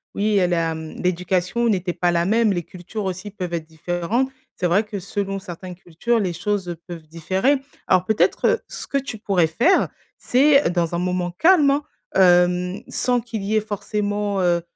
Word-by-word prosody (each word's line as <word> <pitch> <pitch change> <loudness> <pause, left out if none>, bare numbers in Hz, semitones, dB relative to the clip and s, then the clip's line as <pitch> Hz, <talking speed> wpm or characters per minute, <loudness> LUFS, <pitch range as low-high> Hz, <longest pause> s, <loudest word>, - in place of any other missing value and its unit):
oui 210 0 +1
elle 180 -2 +2
a, 165 -1 +1
mmh, 160 0 -7
l'éducation 180 +5 0
n'était 185 -4 0
pas 175 0 0
la 170 0 +2
même, 220 +1 +3
les 175 -2 -2
cultures 180 +6 -7
aussi 190 +2 -4
peuvent 180 -4 -5
être 165 -2 -2
différentes. 175 - -1 0.3
C'est 180 - 0
vrai 195 +5 +3
que 210 -2 -5
selon 195 +1 -3
certaines 180 -1 -8
cultures, 185 +7 -1
les 185 -4 0
choses, 190 +1 -2
heu, 175 - -3
peuvent 170 -3 -8
différer. 190 - +1 0.3
Alors 185 0 +3
peut-être, 220 +1 +2
heu, 470 - +3
ce - - -7
que 280 - 0
tu 270 -5 -4
pourrais 190 -5 +2
faire, 240 - +3 0.3
c'est 275 +3 +4
dans 175 -1 0
un 170 - -1
moment 180 -1 -1
calme 320 - +4
hein, 285 +2 0 0.3
hem, 180 0 +4
sans 245 0 0
qu'il 225 -3 -5
y 215 +2 +1
ait - - +5
forcément, 205 -1 -2
heu 175 -1 +2
190 Hz, 190 wpm, -22 LUFS, 175-215 Hz, 0.3 s, ait